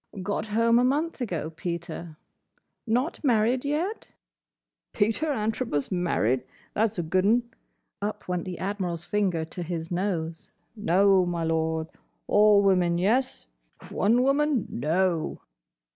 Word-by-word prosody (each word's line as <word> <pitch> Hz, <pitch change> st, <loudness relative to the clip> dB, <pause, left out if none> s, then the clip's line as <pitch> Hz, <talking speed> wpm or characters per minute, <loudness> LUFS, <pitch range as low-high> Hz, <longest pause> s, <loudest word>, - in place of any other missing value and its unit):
"Got 205 Hz, +2 st, -2 dB
home 230 Hz, +2 st, +3 dB
a -, -, +3 dB
month 290 Hz, +4 st, 0 dB
ago, 170 Hz, -9 st, -3 dB
Peter. 170 Hz, -1 st, -6 dB, 0.7 s
Not 250 Hz, +10 st, 0 dB
married 245 Hz, -1 st, +2 dB
yet?" 320 Hz, +9 st, -2 dB, 0.9 s
"Peter 225 Hz, +9 st, +1 dB
Antrobus 220 Hz, -, -1 dB
married? 165 Hz, -, +1 dB, 0.3 s
That's 220 Hz, 0 st, 0 dB
a 175 Hz, -, -1 dB
good 185 Hz, +4 st, +1 dB
'un." 230 Hz, +4 st, +3 dB, 0.6 s
Up 210 Hz, +1 st, -4 dB
went 180 Hz, -2 st, -2 dB
the 180 Hz, -2 st, -5 dB
Admiral's 185 Hz, -4 st, -3 dB
finger 185 Hz, -6 st, 0 dB
to 175 Hz, +3 st, -8 dB
his 165 Hz, -1 st, -4 dB
nose. 170 Hz, -3 st, -2 dB, 0.3 s
"No, 195 Hz, -2 st, +4 dB
my 170 Hz, -1 st, -2 dB
Lord. 160 Hz, 0 st, 0 dB, 0.4 s
All 205 Hz, -1 st, +5 dB
women, 180 Hz, -3 st, +3 dB
yes. 225 Hz, -, +1 dB, 0.5 s
One 230 Hz, +5 st, +3 dB
woman, 275 Hz, -3 st, +2 dB
no!" 165 Hz, +4 st, 0 dB
195 Hz, 125 wpm, -26 LUFS, 170-230 Hz, 0.9 s, All